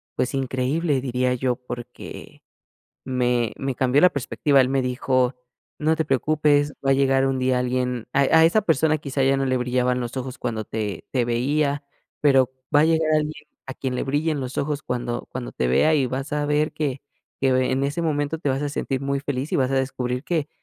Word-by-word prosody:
pues, 125 +2 -1
increíble, 135 +3 0
diría 125 -1 0
yo, 125 0 0
porque 120 -1 -9 0.6
me 125 -3 +1
me 135 -2 -3
cambió 130 +2 +3
la 180 - +7
perspectiva. 140 0 +2
Él 130 - +1
me 135 -1 +1
dijo: 125 0 0 0.4
"No 155 +1 +2
te 160 - 0
preocupes, 145 +1 +2
va 135 - +4
a - - +6
llegar 135 0 +3
un 135 -1 0
día 130 -1 +2
alguien 125 -1 -1
a 140 - +3
a 160 +4 +5
esa 215 +6 +3
persona 160 -3 +2
quizá 140 -1 -2
ya 135 +1 +3
no 135 - 0
le 130 -1 +1
brillaban 125 0 0
los 120 +2 -5
ojos 130 0 -5
cuando 115 -3 -3
te 105 -5 -4
te 125 -3 +1
veía, 140 +4 0 0.4
pero 135 -3 +4 0.3
va - - +7
a - - +5
llegar 160 -1 +2
alguien 150 0 -1 0.2
a 130 - -5
quien 130 -2 -4
le - - -1
brillen 145 +2 0
los 130 +1 -6
ojos 145 0 -1
cuando 120 -1 -3
cuando - - -5
te 60 - -1
vea 155 - +4
y 140 - +2
vas 135 +3 -4
a 150 0 0
ver 150 +1 +1
que 140 -4 -2 0.4
que 135 -1 +3
ve 130 0 +2
en 135 +1 +1
ese 145 +4 -2
momento 150 0 -1
te 145 - -1
vas 135 +1 0
a - - 0
sentir 135 -2 -2
muy 140 0 -1
feliz 140 0 -3
y - - +3
vas 130 0 +1
a - - +1
descubrir 130 -1 -2
que 160 -4 -1
135 Hz, 210 wpm, -23 LUFS, 125-145 Hz, 0.6 s, la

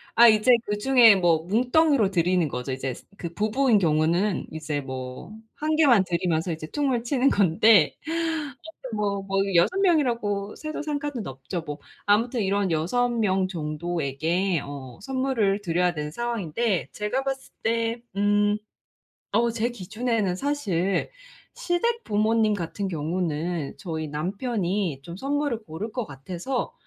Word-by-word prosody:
아 235 +1 +8
이제 215 +3 +5
그중에 225 +1 +5
뭐 170 -3 +2
뭉텅이로 245 - +3
드리는 175 -2 +2
거죠. 125 +1 -4
이제 130 -1 -3
스 - - -14
그 170 -2 -6
부부인 220 +4 +2
경우는 170 +3 +1
이제 150 -2 -3
뭐 130 +5 -7 0.2
1 310 +1 -1
개만 255 -11 +5
드리면서 170 -1 0
이제 155 -1 -5
퉁을 265 -5 0
치는 265 +2 +2
건데 195 -1 +4 0.9
아무튼 220 -3 -5
뭐 200 -1 -1
뭐 195 0 -1 0.2
6 365 - +3
명이라고 235 - +1
세도 310 -1 -5
상관은 290 - -3
없죠, 135 +7 -5
뭐. 145 0 -5 0.3
아무튼 225 +3 +2
이런 195 -2 0
6 215 +11 +1
명 195 -5 +1
정도에게 165 +1 -1
어 135 -3 -8
선물을 245 -6 0
드려야 175 -1 +1
되는 150 -1 -4
상황인데 230 -2 -1
제가 215 +6 -2
봤을 270 -1 -4
때 230 +1 0 0.2
음 205 +1 +3 0.8
어 235 +2 +3
제 230 +1 -1
기준에는 215 -2 -2
사실 195 - -1 0.4
시댁 465 0 -1
부모님 215 0 +2
같은 195 +2 -3
경우는 165 -1 -2
저희 160 -4 -4
남편이 185 - -2
좀 170 +1 -8
선물을 275 -3 -1
고를 185 +8 -6
것 245 -2 -3
같아서 175 - -4
200 Hz, 275 characters per minute, -25 LUFS, 170-235 Hz, 0.9 s, 아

